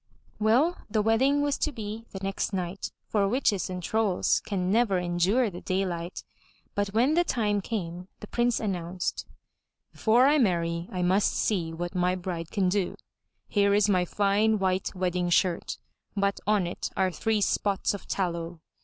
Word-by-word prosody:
Well, 250 +11 +3
the 215 0 +1
wedding 265 +6 +3
was 290 -1 0
to 305 - 0
be 225 -2 -6
the - - -8
next 195 +1 -2
night, 185 0 -3
for 200 -2 +1
witches 210 -5 +1
and 180 -1 -5
trolls 215 -1 +1
can 185 -3 -2
never 220 -3 +3
endure 180 +7 +1
the 175 - -8
daylight. 185 -2 -2 0.5
But 205 0 0
when 235 +9 +2
the 345 +2 +4
time 210 -9 0
came, 180 -4 -4
the - - -8
Prince 240 +2 +1
announced: 180 -3 -3 0.3
* - - -56
'Before 235 +3 +4
I 295 +2 +4
marry, 170 -6 0
I 180 -1 -2
must 190 +3 +3
see 175 -6 0
what 175 +2 -5
my 180 0 +1
bride 175 -3 -5
can 195 -3 +1
do. 190 0 0 0.5
Here 200 -1 +3
is 205 0 +4
my 185 -3 +3
fine, 205 +4 +2
white 190 0 -1
wedding 180 -1 0
shirt, 175 0 +1 0.4
but 200 0 +1
on 210 -3 +3
it 175 - -4
are 190 -1 +2
three 220 +6 0
spots 200 0 +1
of 200 - -8
tallow. 170 -3 -2
195 Hz, 170 wpm, -27 LUFS, 180-220 Hz, 0.5 s, the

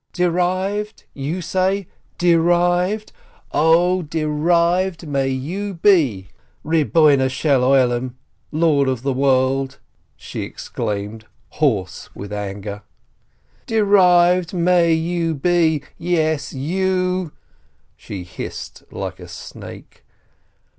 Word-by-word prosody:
"Derived, 185 +4 -1
you 155 +6 -4
say, 190 +3 0 0.3
derived? 175 +4 +2 0.4
0, 175 +4 +3
derived 170 +3 0
may 135 -2 0
you 175 +10 -3
be, 150 - +2 0.3
Lord 155 -2 +3 1.7
of 130 -3 -2
the 135 -1 0
World," 135 0 +1 0.4
she - - -7
exclaimed, 105 +2 -5 0.2
hoarse 105 - -1
with 100 +1 -7
anger, 100 0 -5 0.9
"derived 180 -4 +4
may 175 -1 +3
you 165 0 0
be! 160 -1 +2 0.2
Yes! 160 -4 0
You 185 +3 -1 0.3
!" - - -41
she 95 -3 -8
hissed 85 - -8
like - - -6
a - - -10
snake. - - -11
165 Hz, 85 wpm, -20 LUFS, 135-180 Hz, 1.7 s, derived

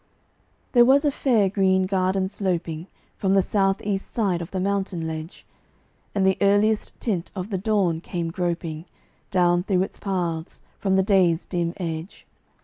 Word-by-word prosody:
There 240 -2 +7
was 275 +4 +5
a 290 - +3
fair 235 -7 +2
green 190 -1 +2
garden 190 0 +1
sloping 175 -4 -3 0.3
From 195 -1 +1
the 195 -1 +4
south 195 -1 +1
east 200 -1 -3
side 195 -7 0
of 170 - -6
the 190 - -3
mountain 190 -3 -1
ledge; 160 +1 -6 0.7
And 195 -1 +2
the 190 0 +2
earliest 205 +2 +2
tint 190 -7 -2
of 190 +2 -5
the 190 - -1
dawn 190 -5 +1
came 170 -2 -3
groping 170 -2 -3 0.4
Down 175 -2 +3
through 185 -1 +1
its - - -7
paths, 175 -5 -3 0.2
from 195 -2 +1
the 190 - +4
day's 185 -4 +3
dim 170 -2 -2
edge. 165 0 -5
190 Hz, 160 wpm, -24 LUFS, 175-200 Hz, 0.7 s, There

